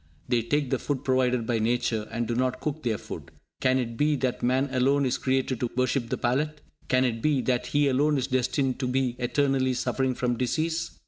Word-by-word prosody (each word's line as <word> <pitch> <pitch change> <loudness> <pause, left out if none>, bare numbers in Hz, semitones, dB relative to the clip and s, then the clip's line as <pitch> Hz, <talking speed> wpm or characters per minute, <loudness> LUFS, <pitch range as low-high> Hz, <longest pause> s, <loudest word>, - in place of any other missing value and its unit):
They 120 -1 +2
take 140 +3 -1
the 130 - +1
food 140 -2 -3
provided 125 -3 +2
by 115 -1 0
Nature, 115 -1 0
and 115 0 -2
do 120 - -1
not 125 +1 0
cook 155 0 -3
their 115 -5 0
food. - - -8 0.3
Can 130 -1 +3
it 115 -3 -3
be 150 +2 +2
that 130 -2 -1
man 130 +3 +2
alone 135 +2 +2
is 125 - 0
created 130 -2 0
to 120 - -1
worship 130 -1 +1
the - - -1
palate? 150 +5 0 0.3
Can 130 0 +3
it 115 -2 -1
be 150 -1 +2
that 125 -1 0
he 145 +1 +2
alone 145 +3 +2
is 130 - 0
destined 130 0 0
to 130 - -1
be 125 -1 0
eternally 130 0 +1
suffering 130 +1 0
from 120 -1 -1
disease? 160 +7 -1
130 Hz, 210 wpm, -27 LUFS, 120-140 Hz, 0.3 s, Can